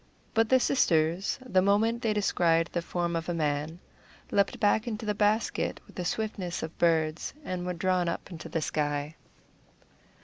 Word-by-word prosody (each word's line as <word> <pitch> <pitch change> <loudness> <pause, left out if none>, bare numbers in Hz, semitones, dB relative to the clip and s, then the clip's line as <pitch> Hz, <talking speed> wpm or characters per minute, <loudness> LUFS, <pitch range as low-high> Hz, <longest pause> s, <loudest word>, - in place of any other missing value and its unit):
But 225 -1 +3
the 260 - +6
sisters, 170 - +2
the 190 -7 +3
moment 220 +4 +2
they 225 - +1
descried 170 -5 +2
the 170 - 0
form 170 0 -2
of 165 +1 -3
a 175 - -1
man, 150 +1 -1 0.5
leaped 200 - +1
back 215 +3 +2
into 220 -1 -4
the 210 - +1
basket 210 +2 +1
with - - -18
the 180 - -4
swiftness 190 -3 -3
of 160 0 -6
birds, 160 +1 +1
and 180 -1 -3
were 180 - -1
drawn 180 0 +1
up 170 - -5
into 165 -2 -8
the 165 - -1
sky. 145 0 -2
180 Hz, 170 wpm, -29 LUFS, 165-210 Hz, 0.5 s, the